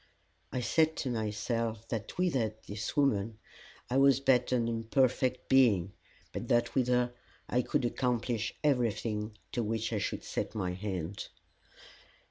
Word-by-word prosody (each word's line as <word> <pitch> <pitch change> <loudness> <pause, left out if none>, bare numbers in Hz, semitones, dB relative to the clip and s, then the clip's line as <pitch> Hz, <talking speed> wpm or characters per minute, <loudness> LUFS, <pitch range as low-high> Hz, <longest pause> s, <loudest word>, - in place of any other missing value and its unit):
I 125 - -1
said 160 +5 +2
to 130 - -2
myself 110 0 -2
that 110 -2 -4
without 125 -12 0
this 105 +7 -5
woman 110 -6 +2 0.5
I 125 - 0
was 135 -1 +6
but 130 -3 +3
an 120 -2 +2
imperfect 125 +2 +1
being, 110 -9 +4 0.4
but - - -4
that 120 0 +2
with 130 -2 +2
her 125 0 +2 0.3
I 125 - +2
could 125 - 0
accomplish 120 -2 -1
everything 110 -5 0
to 120 - -1
which 115 +1 -1
I 105 - +1
should - - -3
set - - -3
my 90 -4 -1
hand. 95 -1 -4
115 Hz, 140 wpm, -31 LUFS, 105-125 Hz, 0.5 s, was